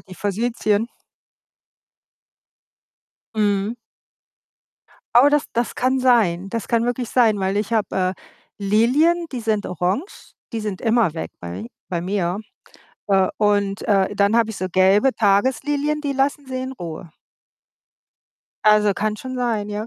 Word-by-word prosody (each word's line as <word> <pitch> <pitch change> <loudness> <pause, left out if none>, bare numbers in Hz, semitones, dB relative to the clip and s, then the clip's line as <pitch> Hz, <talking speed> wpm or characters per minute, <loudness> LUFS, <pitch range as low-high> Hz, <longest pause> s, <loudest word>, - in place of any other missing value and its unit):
die 185 - -13
Forsythien. 215 +2 -1 2.5
Mhm. 205 0 0 1.4
Aber 250 +4 +7
das 295 0 +2
das 235 0 -1
kann 260 +1 +1
sein. 205 -8 +2
Das 230 +1 -4
kann 230 -1 +2
wirklich 245 -1 -2
sein, 225 -5 +3
weil 190 +1 -1
ich 210 +2 -2
habe, 220 -2 0
äh, 185 0 0 0.4
Lilien, 255 - +2
die 250 - -3
sind 220 -2 -1
orange, 185 - -3 0.2
die 225 - -2
sind 210 -3 -4
immer 225 -6 +2
weg 160 - -5
bei 85 - -7
mi 115 - -9 0.2
bei 175 -2 -2
mir. 180 0 -1 0.7
Äh, 190 -2 +3
und, 205 -1 +1
äh, 200 -1 +2
dann 200 +2 +2
habe 230 -1 +2
ich 220 - -7
so 185 - -2
gelbe 195 +8 +4
Tageslilien, 265 +8 +1
die 285 -2 -1
lassen 275 +1 0
sie 260 0 -4
in 260 0 -5
Ruhe. 170 -6 -8 1.5
Also, 210 -1 +5
kann 215 +2 -1
schon 255 +4 -7
sein, 230 -5 -1
ja. 210 +1 -4
215 Hz, 140 wpm, -21 LUFS, 195-245 Hz, 2.5 s, Aber